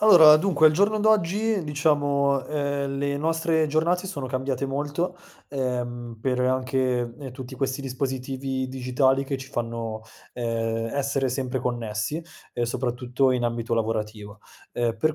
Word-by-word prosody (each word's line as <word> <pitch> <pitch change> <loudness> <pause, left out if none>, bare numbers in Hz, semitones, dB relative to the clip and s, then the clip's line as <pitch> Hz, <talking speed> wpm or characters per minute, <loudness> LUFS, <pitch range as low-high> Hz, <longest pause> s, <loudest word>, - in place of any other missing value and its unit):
Allora, 165 -8 +9
dunque, 160 -2 +4
al 155 - +6
giorno 205 +6 +2
d'oggi, 215 0 +2
diciamo, 145 -2 +2
uhm, 140 -2 -2
le 140 0 0
nostre 160 +1 +1
giornate 170 +5 +1
sono 160 -9 -4
cambiate 130 +1 -2
molto, 145 +6 -2 0.3
ehm, 120 -3 -3
per 125 +1 0
anche, 130 -1 0
uhm, 135 -1 -7
tutti 130 0 -8
questi 135 +1 -2
dispositivi 130 0 -3
digitali 130 +1 +1
che 135 0 -3
ci 135 0 -9
fanno, 115 -3 -4 0.3
uhm, 115 -1 -1
essere 135 -1 0
sempre 130 0 -2
connessi, 120 +5 -2 0.3
uhm, 120 - +1
soprattutto 125 +2 0
in 125 -1 +1
ambito 120 0 -2
lavorativo. 110 -2 -2 0.3
Uhm, 115 -2 0
per 155 +5 +2
130 Hz, 140 wpm, -25 LUFS, 120-145 Hz, 0.3 s, Allora